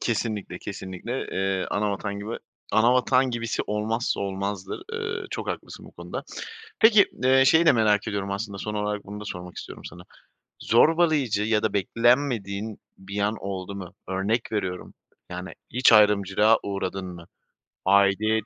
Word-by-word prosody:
Kesinlikle, 110 -5 -2
kesinlikle, 100 +6 -5
eee, 95 0 0
ana 105 0 0
vatan 100 0 -4
gibi 110 +3 -5 0.4
ana 115 +3 +5
vatan 130 +1 +3
gibisi 115 -1 -2
olmazsa 110 +3 -1
olmazdır. 100 -1 -4
Iıı, 450 0 -3
çok - - -4
haklısın - - -6
bu - - -14
konuda. - - -6 0.6
Peki 220 -2 +7
d 130 - -1
eee, 135 - +6
şeyi 160 +5 +5
de - - +8
merak 110 -4 +2
ediyorum 100 -2 -3
aslında: 100 0 -4
Son 105 +2 -4
olarak 105 0 -2
bunu 105 +1 -8
da - - -7
sormak 90 -3 -7
istiyorum - - -9
sana. 90 - -9 0.6
Zorbalayıcı 145 -5 +3
ya 110 -1 +1
da 110 - 0
beklenmediğin 110 -1 +1 0.2
bir 100 +2 -6
an 105 +2 +1
oldu 100 0 -5
mu? 95 -3 -8
Örnek 100 +5 -1
veriyorum, 95 -4 -3 0.4
yani, 90 +1 -6 0.2
hiç 125 0 +5
ayrımcılığa 105 +1 +5
uğradın 95 -1 -3
mı? 85 -2 -9 0.6
Aidiyet 100 +3 +3
105 Hz, 155 wpm, -25 LUFS, 100-115 Hz, 0.6 s, de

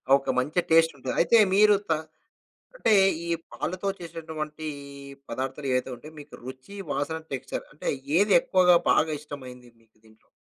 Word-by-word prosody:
ఒక 140 - -2
మంచి 150 +7 0
టేస్టుంటది. 160 -5 +3
అయితే, 230 +7 +5 0.2
మీరు 210 0 +6
త - - +1 0.9
అంటే, 225 - +2 0.3
ఈ - - -5 0.2
పాలతో 185 +2 -3
చేసేటువంటీ 160 -2 -6 0.6
పదార్థాలేవైతే 130 +1 -2
ఉంటాయో, 155 +5 -12
మీకు - - -13
రుచి, 130 +9 -10 0.2
వాసన, 145 +4 -2
టెక్స్‌చర్ 135 0 -4
అంటే, 150 - -6 0.3
ఏది 200 +1 +4
ఎక్కువగా 180 -1 +4 0.2
బాగా 155 0 +2
ఇష్టమైంది 130 -5 -10
మీకు 110 -1 -33
దీంట్లో? 110 0 -24
150 Hz, 130 wpm, -26 LUFS, 130-170 Hz, 0.9 s, మీరు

